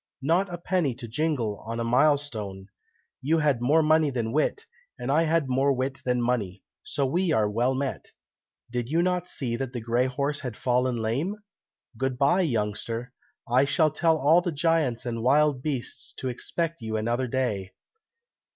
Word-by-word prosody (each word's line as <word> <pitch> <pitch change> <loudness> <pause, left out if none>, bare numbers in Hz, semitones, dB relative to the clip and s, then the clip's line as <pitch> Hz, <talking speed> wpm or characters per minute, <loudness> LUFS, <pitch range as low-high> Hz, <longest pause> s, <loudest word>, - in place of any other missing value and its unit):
not 175 +6 +2
a 175 - -4
penny 170 -7 0
to 120 -2 -8
jingle 120 -5 -1
on 115 +1 -3
a - - 0
mile 135 +6 +4
stone. 105 -9 -5 0.6
You 155 +5 +2
had 145 -6 +1
more 150 +6 +4
money 155 0 +4
than 120 -4 -2
wit, 155 - 0 0.3
and 125 - -3
I 155 +3 +4
had 160 -2 +1
more 135 +2 +2
wit 130 +1 -3
than 125 -1 0
money, 105 -6 -1 0.2
so 140 - -1
we 175 +6 +1
are 110 -7 +3
well 120 +5 +1
met. 135 0 -3 0.6
Did 120 -1 -3
you 165 +3 +2
not 180 -1 0
see 125 -8 -2
that 130 0 -4
the 120 - -3
grey 120 +3 +1
horse 140 +3 -1
had 125 -5 -6
fallen 125 0 +1
lame? 125 - -1 0.6
Good 130 -1 -1
bye, 140 +8 +3
youngster! 115 - -2 0.3
I 125 +3 +4
shall 155 +2 +2
tell 160 +1 +2
all 155 +5 +5
the 175 - -2
giants 155 -6 +1
and 115 -2 -3
wild 140 +2 +3
beasts 135 -4 -4
to 130 - -3
expect 165 +6 -3
you 110 -1 -2
another 120 +4 -1
day!" 110 -7 -2
130 Hz, 180 wpm, -26 LUFS, 120-155 Hz, 0.6 s, all